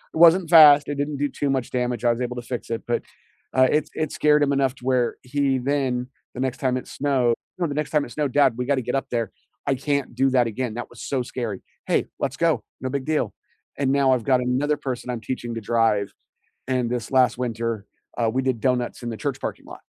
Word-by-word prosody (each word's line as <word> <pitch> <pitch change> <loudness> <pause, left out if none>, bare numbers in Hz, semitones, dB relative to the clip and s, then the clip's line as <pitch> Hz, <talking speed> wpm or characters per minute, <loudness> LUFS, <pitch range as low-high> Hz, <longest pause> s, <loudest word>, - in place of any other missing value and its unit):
It - - -2
wasn't 170 +1 +7
fast, 150 -3 +8
it - - -1
didn't 145 0 -2
do 145 +1 +1
too 140 +1 -2
much 130 -2 -1
damage, 125 -1 -1
I 120 - +5
was 115 +2 -2
able 125 0 -2
to 120 - -4
fix 120 -1 -5
it, 115 - -3
but, 120 - 0 0.5
uh, 130 0 +4
it 150 0 +2
s - - -20
it 155 -2 -2
scared 150 -1 +3
him 140 0 +2
enough 135 -1 +1
to 125 - -14
where 125 -2 +1
he 135 0 0
then, 130 -2 0 0.3
the - - -6
next 130 -1 -2
time 130 -2 +1
it - - -7
snowed 130 -4 +1 0.2
no, 175 - 0
the 145 - -2
next 150 0 -2
time 150 -2 +1
it 120 - -12
snowed, 145 -4 -1
"Dad, 140 -3 +4
we 125 0 -3
gotta 135 -3 +1
get 125 - -3
up 135 - -1
there. 115 -4 -2 0.3
I 140 - +2
can't 140 0 -1
do 135 +2 +2
that 125 -2 +3
again, 115 0 -3
that 120 - -5
was - - -13
so 130 -3 -1
scary." 115 -6 -4 0.3
"Hey, - - +2
let's - - -2
go, - - +2 0.2
no 130 - -3
big 140 -2 -2
deal." 155 0 0 0.5
And 135 -1 +2
now 140 -1 +3
I've 120 -3 0
got 130 -2 +3
another 140 +4 +1
person 125 -2 -5
I'm 120 -2 -2
teaching 120 0 -4
to 115 - -4
drive, 110 -2 +1 0.5
and 125 -2 0
this 120 0 -3
last 130 -2 +4
winter, 115 -3 -3 0.3
uh, 115 - +2
we 130 +3 0
did 130 -3 0
donuts 125 0 0
in 120 - -3
the 110 - -5
church 140 -1 -3
parking - - -5
lot. - - -11
130 Hz, 245 wpm, -23 LUFS, 120-140 Hz, 0.5 s, fast